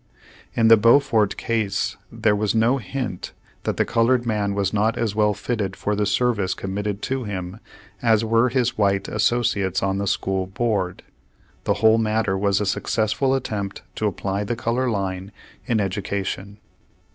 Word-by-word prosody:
In 115 - +4
the 115 0 +8
Beaufort 115 -1 +4
case 110 -5 -1 0.2
there 105 -2 +1
was 105 +1 0
no 115 +4 +3
hint 120 -4 -5 0.3
that - - -1
the - - +2
colored 120 +1 +2
man 105 -3 0
was 100 0 0
not 110 +2 +1
as 110 -4 -1
well 105 -1 +2
fitted 105 -3 -2
for 105 +2 -1
the 105 0 0
service 105 -2 +1
committed 100 +1 -4
to 135 -1 -2
him, 95 0 -5 0.4
as 115 -2 +3
were 115 +3 +3
his 125 -2 0
white 100 -1 +2
associates 105 -3 +1
on 95 0 0
the 100 - -2
school 95 -1 -1
board. 100 -3 -1 0.6
The - - +2
whole 110 +1 +6
matter 110 -3 +1
v/as 100 0 +1
a 105 - -1
successful 110 +6 0
attempt 105 -6 -4
to 110 - +1
apply 100 +1 -2
the 120 +3 -2
color 120 +3 0
line 95 -2 -3 0.4
in 115 - +2
education. 100 0 -3
105 Hz, 160 wpm, -23 LUFS, 100-115 Hz, 0.6 s, the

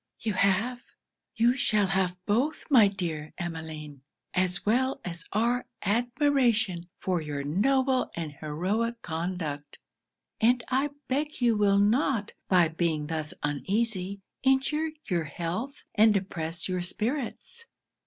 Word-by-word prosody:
'You 220 -2 -1
have, 200 +6 +2 0.5
you 240 +1 +4
shall 215 -5 +2
have 190 -1 0
both, 250 +9 +1
my 230 -7 +8
dear 165 -6 -4
Emmeline! 160 -5 -6 0.3
as 180 -1 0
well 260 +5 +2
as 170 -1 -6
our 235 +4 +1 0.2
admiration 235 - +2
for 180 -3 -1
your 145 -2 -4
noble 260 - +2
and 165 -3 -3
heroic 190 +11 -2
conduct; 160 -3 -4 0.6
and 245 +2 +4
I 270 +3 +2 0.2
beg 295 +4 -1
you 240 -3 +3
will 205 -1 +4
not, 215 +1 +2
by 180 -3 +5
being 160 -2 0
thus 155 -1 -3
uneasy, 195 +5 -1 0.2
injure 270 +4 +2
your 170 -4 -1
health 175 - -4
and 220 0 +6
depress 175 -4 -2
your 185 -1 -1
spirits.' 250 - -2
200 Hz, 125 wpm, -28 LUFS, 170-245 Hz, 0.6 s, my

